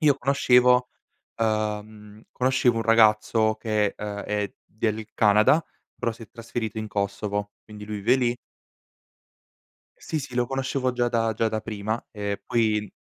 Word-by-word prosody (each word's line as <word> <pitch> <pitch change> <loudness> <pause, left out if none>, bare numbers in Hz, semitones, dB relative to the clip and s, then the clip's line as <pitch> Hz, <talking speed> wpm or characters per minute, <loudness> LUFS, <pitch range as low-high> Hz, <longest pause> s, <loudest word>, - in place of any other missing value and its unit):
io 150 -3 +5
conoscevo 125 -2 +4 0.5
uhm, 110 -1 -3
conoscevo 130 -2 +2
un 115 - 0
ragazzo 110 -1 +4
che, 105 -3 0
uhm, 105 -1 -5
è 105 -1 -2
del 110 0 -3
Canada 110 +9 +4 0.4
però 115 -2 -1
si 115 - -13
è 110 - -11
trasferito 115 -1 -5
in 110 - -4
Kosovo, 100 0 -2
quindi 105 -1 -10
lui 105 0 -4
vive 120 +6 +4
lì. 120 -2 0 1.6
Sì, 155 - -3
sì 135 -3 -8
lo 125 -1 +2
conoscevo 135 0 -1
già 120 -1 +1
da 115 -2 +1
già 115 +1 0
da 110 0 -2
prima, 110 +1 -3
e 100 -1 -4
poi 110 -2 +2
in 105 -1 -5
110 Hz, 150 wpm, -25 LUFS, 105-120 Hz, 1.6 s, io